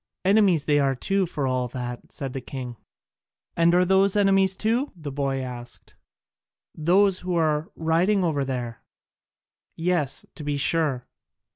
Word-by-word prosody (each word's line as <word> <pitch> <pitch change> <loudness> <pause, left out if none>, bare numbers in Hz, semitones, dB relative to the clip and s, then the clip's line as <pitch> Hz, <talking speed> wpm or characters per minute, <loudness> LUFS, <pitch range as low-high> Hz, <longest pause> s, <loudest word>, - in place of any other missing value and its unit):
"Enemies 195 -6 +4
they 145 -1 +3
are 135 -1 +1
too 195 +8 0
for 145 -4 -3
all 130 -1 0
that," 125 -1 -6
said 135 -2 -5
the 135 - -4
king. 125 -2 -7 0.8
"And 170 0 +4
are 180 0 +4
those 190 +1 +3
enemies 195 -2 +3
too?" 235 +7 0
the 150 -5 -7
boy 135 -1 -2
asked, 120 -2 -8 0.8
"those 185 +4 +3
who 180 -1 -3
are 155 -2 +1
riding 175 +5 +1
over 150 -5 0
there?" 125 -4 -4 0.9
"Yes, 165 -5 -1
to 150 - -9
be 145 0 -2
sure." 140 -3 +1
155 Hz, 145 wpm, -24 LUFS, 135-185 Hz, 0.9 s, Enemies